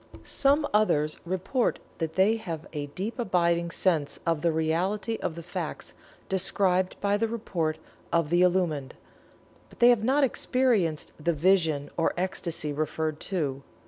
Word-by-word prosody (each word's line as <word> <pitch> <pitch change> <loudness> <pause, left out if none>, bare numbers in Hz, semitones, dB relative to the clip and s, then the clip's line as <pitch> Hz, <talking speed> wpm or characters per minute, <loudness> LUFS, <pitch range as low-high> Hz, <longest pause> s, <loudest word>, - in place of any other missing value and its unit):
Some 285 +2 +2
others 155 -8 +2
report 190 +8 0 0.2
that 160 -1 -3
they 205 +4 +4
have 170 -8 -6
a 145 -2 -3
deep 200 - -5
abiding 170 -5 +1
sense 165 -4 0
of 165 -3 +1
the 170 0 +2
reality 180 +8 0
of 160 - -2
the 170 - -7
facts 175 - -5 0.3
described 185 -1 +1
by 205 0 +2
the 225 +2 +1
report 170 -8 -2 0.3
of 165 -2 +1
the 175 +1 +4
Illumined, 175 -7 +1 0.7
but - - -19
have 240 -3 +5
not 270 +5 +3
experienced 235 - +1
the 170 - +2
"vision" 160 -3 +2
or 165 - +1
ecstasy 170 -4 -2
referred 155 +1 -2
to. 145 -8 -1
175 Hz, 145 wpm, -27 LUFS, 160-205 Hz, 0.7 s, have